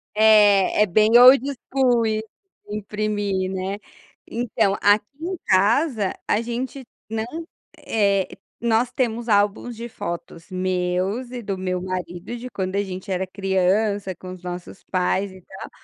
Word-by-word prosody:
É 210 -2 +5
é - - +4
bem 215 +5 +5
old 255 +1 +9 0.3
school 245 -4 +3
im 215 0 0 0.5
imprimir, 205 -2 -2
né. 190 +2 -3 0.5
Então, 220 -4 0
aqui 205 +1 +4 0.2
em 365 +2 -3
casa 210 - +2
a 210 - +2
gente 250 +3 -4 0.2
não 220 0 -2 0.5
eh, 200 -3 +1 0.3
nós 235 +1 +1
temos 240 -2 -1
álbuns 205 +3 +1
de 235 +2 -6
fotos 170 -4 -7
meus 185 +6 -1
e 245 - -5
do 200 -3 -4
meu 185 -1 -2
marido, 180 +3 -5
de 250 +2 -7
quando 190 -4 -3
a 200 - +1
gente 190 0 -7
era 185 0 0
criança, 195 +1 0
com 185 0 -9
os 185 - -12
nossos 180 +1 -7
pais 190 +1 0
e 185 - -14
tal, 190 +2 -10
205 Hz, 145 wpm, -23 LUFS, 185-230 Hz, 0.5 s, old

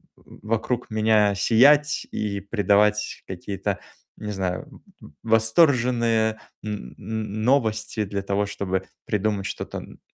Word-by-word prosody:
вокруг 115 +3 -3
меня 110 -2 +3
сиять 145 +8 +4
и 100 -2 -2
придавать 105 0 +1
какие-то, 95 +1 -4 0.4
не 105 -1 -5
знаю, 95 -2 -4 0.2
э, - - -12 0.2
восторженные 115 -2 +3 0.2
н 105 -12 -6
н 110 0 -4
новости 110 -4 +1
для 100 0 -3
того, 100 +1 0
чтобы 95 -2 -2 0.2
придумать 105 -1 -1
что-то - - -5
н - - -13
110 Hz, 115 wpm, -24 LUFS, 100-115 Hz, 0.4 s, сиять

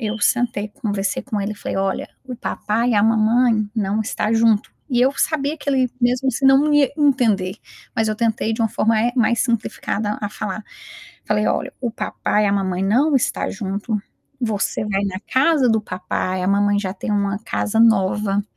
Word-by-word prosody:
eu 220 -1 -3
sentei, 225 -2 +1
conversei 205 -2 -3
com 225 -6 -3
ele 200 +2 -2
e - - -8
falei: - - -5
"Olha, 195 0 -1 0.2
o 255 -1 -6
papai 230 0 -1
e - - +2
a 205 - +4
mamãe 225 0 +3
não 210 -1 0
está 215 0 -1
junto". 225 -1 +2 0.2
E 245 -3 +1
eu 265 +2 +3
sabia 305 -1 0
que 290 - -7
ele 260 -3 +2
mesmo 250 +2 +2
se 270 +4 +1
não 270 0 +7
não 300 - +1
ia 290 -3 +4
entender, 230 -10 +2 0.4
mas 225 -2 +1
eu 215 - 0
tentei 225 -1 0
de 230 - -1
uma 225 - +2
forma, 220 +1 +1
eh, 240 +2 +1
mais 235 0 +2
simplificada 215 -3 -1
a 205 - -2
falar. 210 0 -5 0.6
Falei 210 0 0
olha: 270 - -1
"O 245 -2 -1
papai 210 -1 -1
e - - +3
a 200 - +1
mamãe 190 -2 -1
não 255 +10 +2
está 260 - 0
junto, 200 +2 -3 0.4
você 215 -2 -1
vai 200 -1 0
na 190 -1 -3
casa 270 0 +3
do 220 -1 +3
papai, 185 -1 -3
a 185 - 0
mamãe 205 +1 +2
já 190 -2 -2
tem 205 - -4
uma 200 -1 0
casa 220 -1 -2
nova, 205 -2 +3
220 Hz, 195 wpm, -20 LUFS, 205-245 Hz, 0.6 s, não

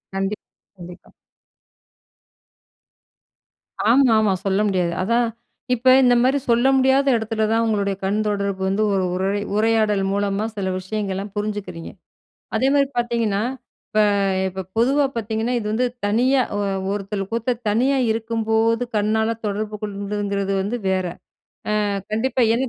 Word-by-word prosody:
கண்டிப் 195 +2 -2 0.3
கண்டிப்பா. 175 0 -12 2.8
ஆமாமா. 225 -5 +4
சொல்ல 195 0 +1
முடியாது. 180 -3 0
அதான். 235 +4 +2 0.5
இப்ப 250 +1 +2
இந்த 245 -1 +5
மாரி 260 +3 +3
சொல்ல 240 +3 +4
முடியாத 265 +1 +3
இடத்துல 220 0 -2
தான் 230 +1 +2
உங்களுடைய 200 -3 0
கண்தொடர்பு 200 -1 -1
வந்து 195 +3 +1
ஒரு 190 -1 +1
உரய் 195 +2 -1
உரையாடல் 215 -2 +2
மூலமா 200 +1 0
சில 190 -2 -2
விஷயங்கள்லாம், 195 0 -4
புரிஞ்சிக்கிறீங்க. 205 -5 -4 0.7
அதே 260 +4 +2
மாரி 280 -1 +4
பார்த்தீங்கன்னா, 230 -4 0 0.5
இப்ப 215 - +2 0.5
இப்ப 190 0 -6
பொதுவா 275 +5 +3
பார்த்தீங்கன்னா, 225 +2 -1
இது 215 - -5
வந்து 245 +3 +1 0.2
தனியா 255 +6 +3
அ - - -1 0.3
ஒருத்தல் 195 -1 -4
கூத்த 235 +1 -1
தனியா 255 +6 +2
இருக்கும்போது 225 +1 0
கண்ணால 220 +2 +1
தொடர்பு 210 +1 -3
கொள்ங்கிறது 200 -1 -2
வந்து 215 +5 -3
வேற. 185 -1 0 0.8
அ - - 0 0.3
கண்டிப்பா, 250 +4 +1
ஏன்னா 260 +2 0
215 Hz, 120 wpm, -21 LUFS, 200-230 Hz, 2.8 s, இந்த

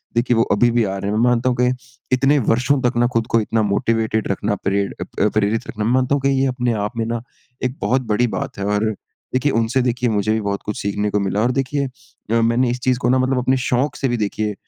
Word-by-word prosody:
देखिए 120 0 +2
वो 115 - +5
अभी 120 +4 +4
भी 120 0 +2
आ 100 -2 -2
रहे 100 +1 -3
हैं। 105 - 0
मैं 115 - +2
मानता 125 +1 +2
हूँ 125 - -1
कि 125 - +4 0.5
इतने 135 +3 +3
वर्षों 125 +4 +2
तक 125 -1 0
ना 120 0 +4
खुद 115 0 0
को 115 - +2
इतना 110 +1 0
मोटिवेटेड 110 +2 0
रखना, 100 +1 -1
प्रेर 100 +1 -1 0.3
अ - - +3
प्रेरित 105 +1 0
रखना 105 -1 -3
मैं 115 - +1
मानता 130 +2 +2
हूँ 140 - -1
कि - - +4
ये - - +3
अपने 125 -2 0
आप 105 +3 -4
में 115 - 0
ना 115 0 -2 0.4
एक 130 +2 -2
बहुत 130 +1 +1
बड़ी 120 +3 +2
बात - - -4
है। 100 - -2
और 105 +1 +1 0.5
देखिए 130 +3 +1
उनसे 115 +3 +1
देखिए 125 0 0
मुझे 105 0 0
भी 110 - 0
बहुत 100 -1 -2
कुछ 105 - -4
सीखने 105 +1 -1
को 105 - +1
मिला। 100 +1 0
और 120 +3 +2
देखिए 140 +1 -2 0.5
अ, 115 - +3
मैंने 120 +2 +2
इस 125 - -3
चीज़ 125 -1 +2
को 120 - 0
ना 130 +1 +3
मतलब 130 0 +1
अपने 130 +1 +2
शौक़ 130 +4 +1
से 135 - 0
भी 120 - 0
देखिए 105 0 -1
115 Hz, 260 wpm, -20 LUFS, 105-125 Hz, 0.5 s, वो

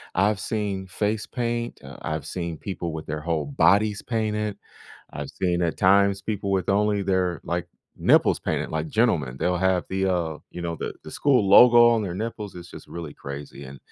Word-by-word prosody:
I've 100 +2 +2
seen 100 -4 -3
face 105 +3 -2
paint, 120 -1 -3
uh, 70 +1 -10
I've 75 -2 -3
seen 85 0 -4
people 85 -3 -5
with 80 -1 -7
their 75 0 -4
whole 80 -3 -1
bodies 100 +8 +3
painted. 105 -3 -2 0.6
I've - - -6
seen 90 -1 +1
at 85 -2 0
times 100 0 +4
people 100 -1 -3
with 95 -1 0
only 105 0 +2
their, 95 -3 0
like, 85 0 -3 0.3
nipples - - +3
painted, - - -2
like 80 0 -2
gentlemen, 75 - +1
they'll 90 +4 +1
have 95 -1 +2
the, 95 0 0
uh, 85 -4 -1
you 90 - -8
know, 85 -1 -2
the - - -5
the 80 - -9
school 125 -8 +2
logo 120 +3 +8
on 115 -2 +2
their 90 -4 -4
nipples, 105 -1 -5
it's 85 0 -10
just - - -12
really 85 -4 -7
crazy 70 0 -8
and 70 +1 -10
95 Hz, 190 wpm, -24 LUFS, 85-105 Hz, 0.6 s, logo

